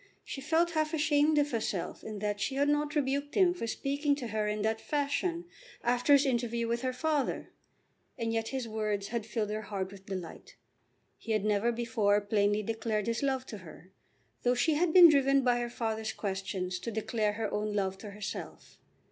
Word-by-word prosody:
She 270 Hz, -, -6 dB
felt 325 Hz, +4 st, +2 dB
half 310 Hz, 0 st, 0 dB
ashamed 300 Hz, 0 st, +3 dB
of 290 Hz, 0 st, +2 dB
herself 215 Hz, -6 st, -3 dB
in 215 Hz, -1 st, -6 dB
that 205 Hz, 0 st, -2 dB
she 270 Hz, -, -1 dB
had 285 Hz, +1 st, +2 dB
not 295 Hz, +1 st, +1 dB
rebuked 285 Hz, 0 st, -1 dB
him 365 Hz, -3 st, +5 dB
for 355 Hz, -10 st, -4 dB
speaking 285 Hz, +4 st, 0 dB
to 250 Hz, -5 st, -6 dB
her 215 Hz, -1 st, -1 dB
in 210 Hz, 0 st, -1 dB
that 220 Hz, 0 st, 0 dB
fashion 305 Hz, +4 st, -1 dB, 0.4 s
after 245 Hz, +4 st, +3 dB
his 280 Hz, 0 st, +6 dB
interview 235 Hz, -2 st, 0 dB
with 235 Hz, +1 st, -1 dB
her 255 Hz, 0 st, 0 dB
father, 295 Hz, +2 st, -1 dB, 0.7 s
and 230 Hz, -2 st, -1 dB
yet 225 Hz, 0 st, -1 dB
his 260 Hz, -2 st, -3 dB
words 215 Hz, -2 st, -2 dB
had 225 Hz, -1 st, -3 dB
filled 210 Hz, -1 st, -2 dB
her 215 Hz, 0 st, -2 dB
heart 195 Hz, -3 st, -4 dB
with 195 Hz, -1 st, -13 dB
delight. 185 Hz, -4 st, -7 dB, 0.6 s
He 225 Hz, -, -3 dB
had 215 Hz, -1 st, 0 dB
never 210 Hz, +2 st, +2 dB
before 225 Hz, -3 st, +1 dB
plainly 205 Hz, 0 st, +1 dB
declared 220 Hz, -1 st, -2 dB
his 230 Hz, 0 st, -1 dB
love 265 Hz, -2 st, 0 dB
to 215 Hz, -, -8 dB
her, 180 Hz, +1 st, -13 dB, 0.5 s
though 245 Hz, 0 st, +2 dB
she 310 Hz, +6 st, +2 dB
had 325 Hz, +3 st, +2 dB
been 355 Hz, 0 st, +10 dB
driven 275 Hz, -3 st, +4 dB
by 245 Hz, -1 st, +3 dB
her 240 Hz, 0 st, -2 dB
father's 220 Hz, -2 st, -3 dB
questions 190 Hz, -2 st, -3 dB
to 180 Hz, -, -5 dB
declare 220 Hz, -1 st, -1 dB
her 220 Hz, 0 st, -3 dB
own 210 Hz, 0 st, -1 dB
love 190 Hz, -1 st, -1 dB
to 210 Hz, -, -8 dB
herself. 200 Hz, 0 st, -7 dB
230 Hz, 195 wpm, -31 LUFS, 210-280 Hz, 0.7 s, been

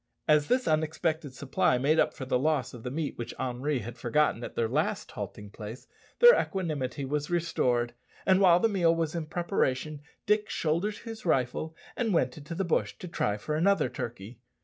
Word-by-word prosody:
As 150 Hz, -1 st, +4 dB
this 250 Hz, +1 st, +1 dB
unexpected 155 Hz, -1 st, 0 dB
supply 130 Hz, -2 st, +1 dB
made 150 Hz, +5 st, +2 dB
up -, -, +3 dB
for 130 Hz, -, -7 dB
the 125 Hz, -1 st, +1 dB
loss 140 Hz, -3 st, 0 dB
of 120 Hz, -, -9 dB
the 125 Hz, -, -4 dB
meat 145 Hz, +1 st, -3 dB
which 120 Hz, -, -5 dB
Henri 130 Hz, +2 st, -1 dB
had 120 Hz, +3 st, -8 dB
forgotten 120 Hz, 0 st, +1 dB
at -, -, -7 dB
their 115 Hz, -, +1 dB
last -, -, -1 dB
halting 105 Hz, -1 st, -7 dB
place, 110 Hz, +4 st, -8 dB, 0.3 s
their 480 Hz, 0 st, +9 dB
equanimity 150 Hz, -, -3 dB
was 145 Hz, +2 st, -2 dB
restored; 125 Hz, -9 st, +1 dB, 0.3 s
and 190 Hz, 0 st, +4 dB
while 180 Hz, -2 st, +6 dB
the 225 Hz, -, +3 dB
meal 175 Hz, -6 st, +3 dB
was 165 Hz, -2 st, -1 dB
in 165 Hz, -3 st, -3 dB
preparation 155 Hz, -4 st, -1 dB, 0.2 s
Dick 210 Hz, 0 st, +2 dB
shouldered 170 Hz, +7 st, -1 dB
his 225 Hz, -1 st, -8 dB
rifle 155 Hz, +1 st, 0 dB, 0.2 s
and 225 Hz, -6 st, 0 dB
went 125 Hz, -5 st, +1 dB
into 155 Hz, +2 st, -7 dB
the 190 Hz, +2 st, -1 dB
bush 170 Hz, -, 0 dB
to 180 Hz, -, -8 dB
try 105 Hz, -10 st, -1 dB
for 150 Hz, +8 st, -4 dB
another 175 Hz, -2 st, +3 dB
turkey. 115 Hz, -1 st, -7 dB
150 Hz, 190 wpm, -29 LUFS, 125-170 Hz, 0.3 s, their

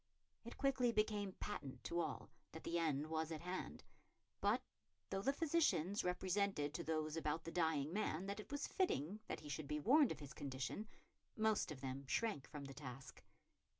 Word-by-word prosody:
It 235 Hz, -, -8 dB
quickly 260 Hz, -3 st, +3 dB
became 210 Hz, -3 st, +1 dB
patent 145 Hz, -12 st, -5 dB
to 170 Hz, -, -1 dB
all 155 Hz, -4 st, -2 dB, 0.2 s
that 160 Hz, -, -7 dB
the 170 Hz, 0 st, +1 dB
end 150 Hz, -3 st, +2 dB
was 160 Hz, 0 st, -1 dB
at 155 Hz, -, -3 dB
hand; 180 Hz, -, -4 dB, 0.6 s
but, -, -, +3 dB, 0.5 s
though 195 Hz, -, 0 dB
the 270 Hz, -, +3 dB
physicians 275 Hz, -, +2 dB
represented 180 Hz, -4 st, +1 dB
to 170 Hz, -, -2 dB
those 155 Hz, -1 st, 0 dB
about 160 Hz, 0 st, 0 dB
the 165 Hz, -, -5 dB
dying 160 Hz, -3 st, +2 dB
man 190 Hz, -4 st, 0 dB
that 200 Hz, +1 st, -3 dB
it 215 Hz, -, -8 dB
was 285 Hz, 0 st, -1 dB
fitting 205 Hz, -, +1 dB
that -, -, -3 dB
he 150 Hz, -, -9 dB
should 145 Hz, 0 st, -3 dB
be 150 Hz, +1 st, 0 dB
warned 280 Hz, -, +6 dB
of -, -, -3 dB
his 145 Hz, 0 st, -8 dB
condition, 140 Hz, -, -3 dB, 0.5 s
most 215 Hz, -5 st, +3 dB
of 135 Hz, -4 st, -6 dB
them 135 Hz, 0 st, -4 dB
shrank 155 Hz, -, 0 dB
from 145 Hz, -2 st, -6 dB
the 135 Hz, -, -7 dB
task. 135 Hz, -2 st, -8 dB
165 Hz, 185 wpm, -42 LUFS, 150-210 Hz, 0.6 s, warned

